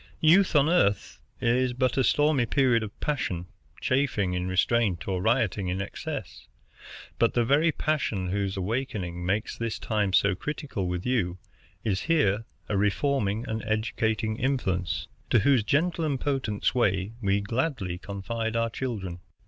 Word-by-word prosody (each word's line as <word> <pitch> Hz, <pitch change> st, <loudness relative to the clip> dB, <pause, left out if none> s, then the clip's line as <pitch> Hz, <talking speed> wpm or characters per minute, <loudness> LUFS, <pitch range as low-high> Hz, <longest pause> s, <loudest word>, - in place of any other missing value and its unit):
Youth 170 Hz, +3 st, +5 dB
on 145 Hz, 0 st, +5 dB
Earth 160 Hz, -, +1 dB, 0.2 s
is 125 Hz, +1 st, +1 dB
a 130 Hz, 0 st, +2 dB
stormy 145 Hz, -3 st, +3 dB
period 125 Hz, -2 st, +3 dB
of 105 Hz, -2 st, -7 dB
passion, 135 Hz, -, -1 dB, 0.3 s
chafing 130 Hz, -9 st, +1 dB
in 90 Hz, 0 st, -2 dB
restraint 95 Hz, -1 st, +1 dB
or 95 Hz, -2 st, -1 dB
rioting 110 Hz, -3 st, +1 dB
in 90 Hz, +2 st, -1 dB
excess. 100 Hz, -, -6 dB, 0.7 s
But 115 Hz, -, +3 dB
the 120 Hz, -1 st, +3 dB
very 150 Hz, +6 st, +4 dB
passion 130 Hz, -, -1 dB
whose 100 Hz, -1 st, -1 dB
awaking 95 Hz, -4 st, -3 dB
makes 100 Hz, +5 st, -1 dB
this 115 Hz, -2 st, -3 dB
time 105 Hz, -3 st, 0 dB
so 100 Hz, +1 st, +4 dB
critical 130 Hz, -, -4 dB
with 90 Hz, 0 st, -3 dB
you 100 Hz, -9 st, 0 dB, 0.5 s
is 100 Hz, -4 st, 0 dB
here 115 Hz, -10 st, +2 dB, 0.2 s
a 105 Hz, -, -1 dB
reforming 105 Hz, +1 st, +1 dB
and 110 Hz, 0 st, -3 dB
educating 110 Hz, 0 st, -1 dB
influence, 105 Hz, -10 st, -1 dB, 0.2 s
to 120 Hz, -, +4 dB
whose 130 Hz, -1 st, +4 dB
gentle 165 Hz, +8 st, +1 dB
and 145 Hz, -4 st, 0 dB
potent 130 Hz, -8 st, -2 dB
sway 100 Hz, -4 st, +1 dB
we 100 Hz, -1 st, +2 dB
gladly 110 Hz, -, -2 dB
confide 115 Hz, +4 st, -4 dB
our 115 Hz, 0 st, +1 dB
children. 100 Hz, -9 st, -4 dB
110 Hz, 145 wpm, -27 LUFS, 95-130 Hz, 0.7 s, Youth